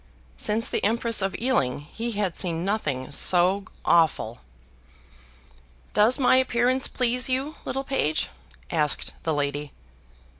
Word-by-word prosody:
Since 215 - -1
the - - -2
Empress 230 +1 +2
of 195 0 -1
Ealing, 145 - 0
he 225 +10 -5
had 200 -4 -1
seen 170 -2 -1
nothing 145 -11 -2
so 185 +6 +4 0.2
awful. 155 -9 +2 1.5
"Does 220 +4 +4
my 255 -1 +4
appearance 255 0 +2
please 250 +1 +1
you, 270 +5 -1
little 270 +1 -3
page?" 160 - 0 0.4
asked 150 -1 0
the 160 - -1
lady. 145 0 -3
200 Hz, 120 wpm, -25 LUFS, 155-245 Hz, 1.5 s, so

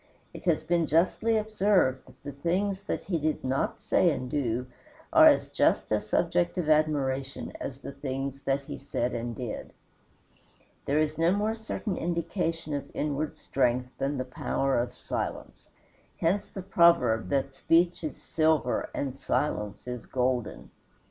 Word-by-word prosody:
It - - -10
has 170 -4 +2
been 170 -2 +1
justly 185 +8 +2
observed 205 -11 +2
that - - -19
the 145 - -5
things 185 +7 -1
that - - -2
he 175 -4 -1
did 155 +1 -1
not 175 - -1
say 180 - +3
and 130 -5 -3
do 125 -4 0 0.5
are - - +9
as - - +5
just - - +1
a - - +3
subject 90 - +1
of 160 -4 +1
admiration 140 -3 0
as 135 0 -5
the - - -6
things 135 0 -4
that 140 0 0
he - - -7
said 125 -3 -2
and 120 0 -3
did. 120 -4 -6 1.1
There 140 - +1
is 155 0 0
no 165 +1 +4
more 210 +3 +1
certain 220 -2 -4
indication 165 -2 -2
of 145 - -3
inward 150 0 -2
strength 125 -1 0
than 140 +1 -1
the 130 - -2
power 135 +1 0
of 120 - -3
silence. - - -5 0.5
Hence 185 +5 +1
the 190 - -8
proverb 170 -11 +4
that 135 -1 0
speech 170 +5 +2
is 155 - -4
silver 155 -6 +1
and 135 -2 -2
silence 105 -6 -2
is 125 -1 -5
golden. 125 -2 -1
145 Hz, 155 wpm, -28 LUFS, 130-170 Hz, 1.1 s, are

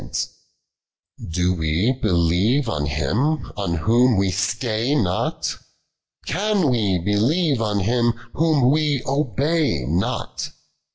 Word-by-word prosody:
203 - - -9
Doc* 90 +1 0
\vv 90 +12 0
Lflieve 95 - +2
on 75 -10 -1
Him, 110 - -1
on 95 -5 -2
Whom 115 +7 +3
we 95 -1 +1
stay 115 +6 -1
not? 95 -10 -1 0.7
Can 195 -4 +1
we 105 -6 +1
believe 115 - +1
on 105 -2 0
Him, 120 +3 +2 0.2
Whom 150 -5 +3
we 150 -3 +1
obey 140 - 0
not 85 +8 -2
115 Hz, 110 wpm, -22 LUFS, 90-140 Hz, 0.7 s, Whom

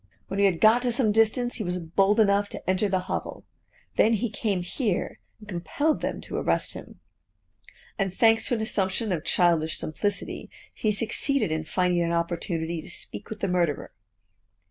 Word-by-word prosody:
When 195 - -3
we 200 - +6
had 175 -4 0
got 220 +3 +6
to 245 -1 +1
some 230 -3 +2
distance, 225 +3 +2
he 220 - -3
was 180 -1 -1
bold 195 +5 +2
enough 200 -1 +3
to - - -8
enter 190 +2 +1
the 185 -1 +1
hovel. 185 - -5 0.5
Then 225 - +5
he 225 0 -1
came 200 -4 -1
here 200 +1 -2 0.2
and 210 - -15
compelled 210 - -1
them - - -3
to - - -5
arrest - - 0
him; - - -11 1.0
and 195 -1 0
thanks 225 +3 +3
to 245 - +1
an 220 - -3
assumption 205 0 0
of 165 -4 -1
childish 165 -3 +2
simplicity, 205 +6 -3 0.2
he 215 - 0
succeeded 230 - +1
in 160 0 -2
finding 180 +1 +1
an 170 0 0
opportunity 170 -1 -2
to - - -12
speak 105 - -5
with 220 - -7
the 200 - +1
murderer. 175 -5 0
195 Hz, 180 wpm, -26 LUFS, 175-220 Hz, 1.0 s, we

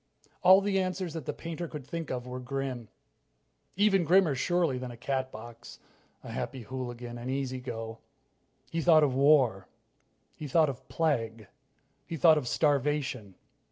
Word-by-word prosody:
All 190 +2 +7
the 195 -1 +1
answers 185 -2 -2
that 160 -5 -6
the - - 0
painter 170 +1 -6
could 150 -4 -8
think 165 +1 -5
of 125 -1 -3
were 125 0 -6
grim. 130 -2 -4 0.9
Even 195 -1 +3
grimmer, 175 -1 +4
surely, 160 -1 +1
than 125 0 -5
a 120 - -10
Catbox, 120 -2 -5 0.5
a - - -8
Happy 130 -3 -4
Hooligan, 120 -1 -6
an 120 +2 -6
Easy 130 -1 -2
Go. 115 -3 -6 0.7
He 165 - -1
thought 160 -1 +6
of 140 -3 +2
war. 130 - +4 0.7
He 150 - -7
thought 155 +2 +3
of 130 0 -8
plague. 115 - -1 0.6
He 165 - -4
thought 155 +2 +6
of 130 - -7
starvation. 140 - 0
135 Hz, 155 wpm, -29 LUFS, 125-165 Hz, 0.9 s, All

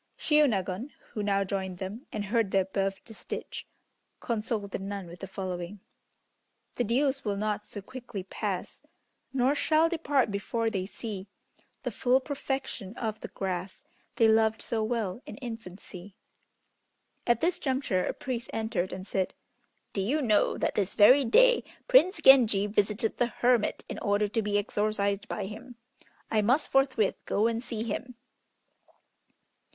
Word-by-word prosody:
Shiônagon, 235 - +2 0.2
who 215 - -3
now 200 -1 +2
joined 190 -2 -3
them, 200 +9 -6
and 210 -1 -3
heard 225 0 +1
the 195 0 +3
above 195 +1 -1
distich, 220 -3 -7 0.5
consoled 215 -3 -2
the - - -3
nun 195 0 -5
with 170 +1 -11
the 195 - -6
following: 185 0 -5 0.9
"The 245 - 0
dews 270 +4 +1
will 205 -2 -1
not 210 0 -2
so 205 - -8
quickly 240 -4 -7
pass, 190 - -4 0.5
Nor 265 +1 +2
shall 315 +2 +3
depart 290 -8 +1
before 225 +3 -1
they 190 -2 -2
see 205 -3 -6 0.6
The - - -2
full 255 +1 +3
perfection 265 -6 -4
of 220 -2 -3
the - - -6
grass, 185 -1 -4 0.3
They 225 - +5
loved 220 0 +3
so 225 -2 -1
well 220 -2 -2
in - - -8
infancy." 200 -6 -9 1.1
At 240 -1 +4
this 345 +2 +1
juncture 260 -9 0
a - - -1
priest 245 -3 -4
entered 220 -5 -1
and 185 0 -6
said, 190 -2 -1 0.6
"Do 195 - 0
you 255 +11 +1
know 215 -4 +3
that - - 0
this 200 -2 0
very 255 +7 +7
day - - +5 0.2
Prince 375 -8 +5
Genji 230 -7 +7
visited 210 +2 0
the 245 - +3
hermit 240 -1 +1
in - - -5
order 205 0 +1
to 225 +2 -1
be 205 -1 0
exorcised 205 -1 0
by 205 - -3
him. 225 +5 -9 0.6
I 215 - +3
must 250 +9 +2
forthwith 260 -7 +2
go 210 - +2
and 230 0 +1
see 230 -3 -4
him." 235 +3 -4
215 Hz, 150 wpm, -29 LUFS, 200-250 Hz, 1.1 s, very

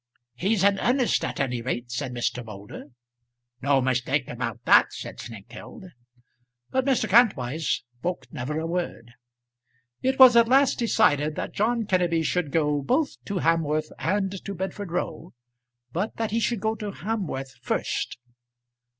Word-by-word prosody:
"He's 190 - 0
in 200 0 +4
earnest 250 0 +2
at 125 - -3
any 125 -3 -1
rate," 120 0 -3
said 125 +1 -3
Mr. 120 0 -2
Moulder. 105 +2 -10 0.8
"No 140 0 +3
mistake 130 +2 0
about - - -5
that," - - +6
said - - -8
Snengkeld. 120 - -10 0.8
But 260 0 +1
Mr. 265 -5 +2
Kantwise 165 - +2 0.2
spoke 180 +6 -3
never 145 +5 -3
a 160 - -3
word. 165 -9 -4 0.9
It 265 +1 +1
was 255 -2 +9
at 235 -1 +6
last 270 +2 +4
decided 155 - +2
that - - -4
John 230 +3 +1
Kenneby 175 -4 +1
should 180 -3 0
go 150 -2 +1
both 280 - 0
to 200 -4 -2
Hamworth 155 -2 +1
and 195 +1 -1
to 200 - -5
Bedford 190 0 -5
Row, 170 -1 -4 0.6
but 190 +6 -2
that 225 -2 -2
he 225 - +1
should 230 -2 0
go 220 +1 +1
to 210 -1 -5
Hamworth 175 - -4
first. - - -2
175 Hz, 150 wpm, -25 LUFS, 135-220 Hz, 0.9 s, was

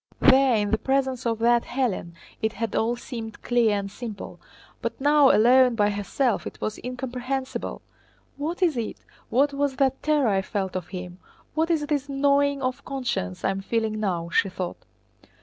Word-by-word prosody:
—there 265 -1 +6
in 205 -1 0
the 220 - +2
presence 265 -2 0
of 230 -1 0
that 235 +1 +4
Hélène 235 -11 -2 0.3
it 220 0 0
had 230 +1 -3
all 235 +2 +1
seemed 230 -3 -8
clear 235 -4 +3
and 200 0 -4
simple; 215 -1 -7 0.4
but - - -3
now, 290 0 +5
alone 250 +2 +5
by 210 -2 +2
herself, 205 +4 -1
it - - -9
was 215 - -3
incomprehensible. 255 +1 -4 0.5
"What 325 +6 -2
is 325 -7 +2
it? 230 -2 -3 0.3
What 280 +4 +3
was 280 -1 0
that 270 0 +1
terror 300 -5 +2
I 195 -1 +2
felt 190 -1 -3
of 180 -2 -3
him? 180 -1 -7 0.3
What 320 +2 +1
is 315 -3 +1
this 285 -1 -1
gnawing 280 0 +2
of 255 0 -2
conscience 250 - -3
I - - +3
am 195 0 -3
feeling 220 +1 -1
now?" 175 -5 -1
she 195 - +2
thought. 185 -1 -5
245 Hz, 175 wpm, -25 LUFS, 210-275 Hz, 0.5 s, there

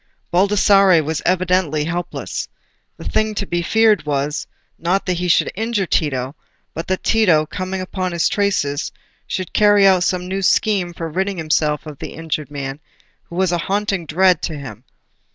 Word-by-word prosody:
Baldassarre 195 -2 +4
was 155 +1 -2
evidently 180 -4 +1
helpless: 170 +3 -4 0.5
the - - -10
thing 215 0 0
to 200 - -2
be 175 -2 -1
feared 220 +4 +3
was, 145 0 -2 0.3
not 180 +4 0
that 180 -2 -1
he 180 - -1
should 170 - +3
injure 220 -1 -1
Tito, 135 -5 -1 0.4
but 165 - -5
that 185 0 -2
Tito, 180 -9 +3
coming 185 +4 -4
upon 185 0 -3
his 170 -1 +1
traces, 170 -8 0 0.4
should 185 -2 -4
carry 205 -1 +5
out 190 -2 +5
some 180 -1 -1
new 190 +1 -2
scheme 195 -2 +2
for 165 -1 -5
ridding 190 +4 -2
himself 155 -2 0
of 150 -3 -9
the - - -7
injured 155 -2 -4
man 140 -1 -5 0.5
who 170 - -11
was 185 -1 +1
a 175 - 0
haunting 195 -2 -1
dread 180 +1 +3
to 155 - -4
him. 125 -4 -9
180 Hz, 170 wpm, -19 LUFS, 155-195 Hz, 0.5 s, carry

